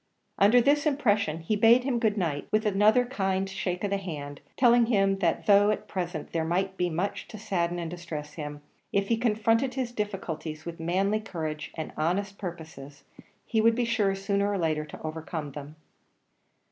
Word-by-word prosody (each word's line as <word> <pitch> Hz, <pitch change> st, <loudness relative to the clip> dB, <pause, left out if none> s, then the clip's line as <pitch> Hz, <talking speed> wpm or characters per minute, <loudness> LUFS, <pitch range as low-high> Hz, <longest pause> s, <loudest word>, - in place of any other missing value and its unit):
Under 220 Hz, +5 st, +6 dB
this 290 Hz, +4 st, +3 dB
impression 205 Hz, -, +1 dB
he 190 Hz, +7 st, 0 dB
bade 230 Hz, +4 st, +5 dB
him 255 Hz, -3 st, 0 dB
good 220 Hz, -2 st, +1 dB
night, 160 Hz, -7 st, -2 dB
with 215 Hz, +1 st, +2 dB
another 210 Hz, +4 st, +4 dB
kind 195 Hz, -6 st, -1 dB
shake 185 Hz, -1 st, -3 dB
of 200 Hz, -, -1 dB
the 200 Hz, -, +2 dB
hand; 145 Hz, -6 st, -7 dB, 0.2 s
telling 240 Hz, -2 st, +5 dB
him 195 Hz, -4 st, +2 dB
that 170 Hz, -4 st, 0 dB
though, 205 Hz, 0 st, +6 dB
at 215 Hz, -, -2 dB
present, 175 Hz, -5 st, -4 dB
there 165 Hz, -1 st, 0 dB
might 190 Hz, +4 st, -1 dB
be 180 Hz, -1 st, 0 dB
much 175 Hz, +5 st, -3 dB
to 215 Hz, -, -9 dB
sadden 175 Hz, -5 st, -1 dB
and 170 Hz, -1 st, -4 dB
distress 165 Hz, -4 st, -6 dB
him, 145 Hz, -2 st, -7 dB, 0.3 s
if 200 Hz, 0 st, 0 dB
he 230 Hz, -, +4 dB
confronted 225 Hz, +2 st, +1 dB
his 255 Hz, -3 st, -2 dB
difficulties 180 Hz, -8 st, -4 dB
with 170 Hz, 0 st, -7 dB
manly 190 Hz, +6 st, +1 dB
courage 155 Hz, -7 st, -5 dB
and 160 Hz, -, -5 dB
honest 195 Hz, +5 st, -1 dB
purposes, 160 Hz, -6 st, -8 dB, 0.4 s
he 220 Hz, -, +1 dB
would 230 Hz, +1 st, +4 dB
be 245 Hz, 0 st, +1 dB
sure 215 Hz, -4 st, +1 dB
sooner 200 Hz, +1 st, 0 dB
or 200 Hz, -, 0 dB
later 155 Hz, -3 st, 0 dB
to 150 Hz, -, -11 dB
overcome 155 Hz, -1 st, -5 dB
them. 145 Hz, +2 st, -9 dB
195 Hz, 185 wpm, -27 LUFS, 165-215 Hz, 0.4 s, Under